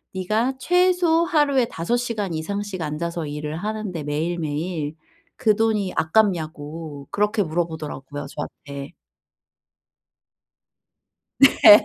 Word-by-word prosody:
네가 215 +7 +1
최소 355 +1 +3
하루에 295 -7 +3
5 230 +4 -1
시간 220 -7 -2
이상씩 195 +3 -3
앉아서 165 +1 -3
일을 150 +1 -4
하는데 210 -3 -3
매일매일 155 +1 -2 0.4
그 220 -5 +3
돈이 215 -4 +1
아깝냐."고 160 -5 0
그렇게 210 +1 +2
물어보더라고요 155 -4 -4
저한테. 140 +2 -7 2.5
네. 215 -6 +8
175 Hz, 230 characters per minute, -23 LUFS, 155-220 Hz, 2.5 s, 네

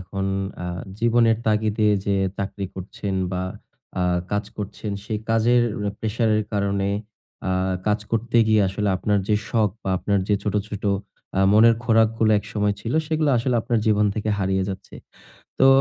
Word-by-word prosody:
এখন 95 +1 -4 0.4
আ - - -3 0.3
জীবনের 115 -1 +4
তাগিদে 110 0 +2 0.2
যে 100 - +1 0.2
চাকরি 100 0 -4
করছেন 95 +1 -5 0.2
বা 90 0 -1 0.6
আ - - +2 0.3
কাজ 105 +1 0
করছেন 105 0 -5
সেই 110 -2 -2
কাজের 120 +2 +4 0.4
প্রেশারের 110 -1 +1
কারণে 100 -1 0 0.6
আ - - +1 0.4
কাজ 105 +1 +2
করতে 115 +1 0
গিয়ে 110 -2 +4
আসলে 105 +2 -1
আপনার 105 +2 +1
যে 105 - +4
শখ 110 -3 +2
বা 95 - -2
আপনার 100 -1 +1
যে 105 - +4
ছোট, 105 - -2
ছোট 105 -1 -6 0.5
আ - - +4
মনের 115 +2 +7
খোরাকগুলা 115 -1 +3
একসময় 105 -1 -1
ছিল 115 +4 -4
সেগুলা 155 -2 +1
আসলে 120 +1 0
আপনার 120 -2 +1
জীবন 105 -1 +3
থেকে 110 0 -3
হারিয়ে 95 -1 +1
যাচ্ছে। 95 0 -7 0.6
তো 135 - +6
105 Hz, 155 wpm, -23 LUFS, 100-115 Hz, 0.6 s, মনের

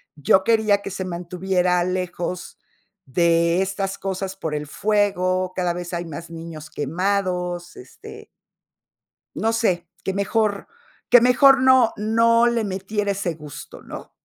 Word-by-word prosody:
yo 155 +6 +3
quería 215 -2 +3
que 195 - -6
se 190 0 -4
mantuviera 180 0 0
lejos 180 -1 -4 0.5
de 170 +4 +2
estas 195 0 -2
cosas 190 0 -4
por 160 -5 -4
el 150 0 -3
fuego, 185 -1 0
cada 180 -2 0
vez 175 0 -6
hay 175 0 -3
más 165 +1 -8
niños 165 -2 -9
quemados, 180 +3 -2
este 385 - -12 1.1
no 225 +1 0
sé, 180 -7 0 0.2
que 190 - -2
mejor 200 +1 0 0.4
que 245 - +7
mejor, 265 +2 +6
no 260 -3 +5
no 230 +2 +3
le 235 -2 0
metiera 200 +1 -2
ese 190 -4 -3
gusto, 150 -3 -11
¿no? - - -10
185 Hz, 135 wpm, -22 LUFS, 175-210 Hz, 1.1 s, que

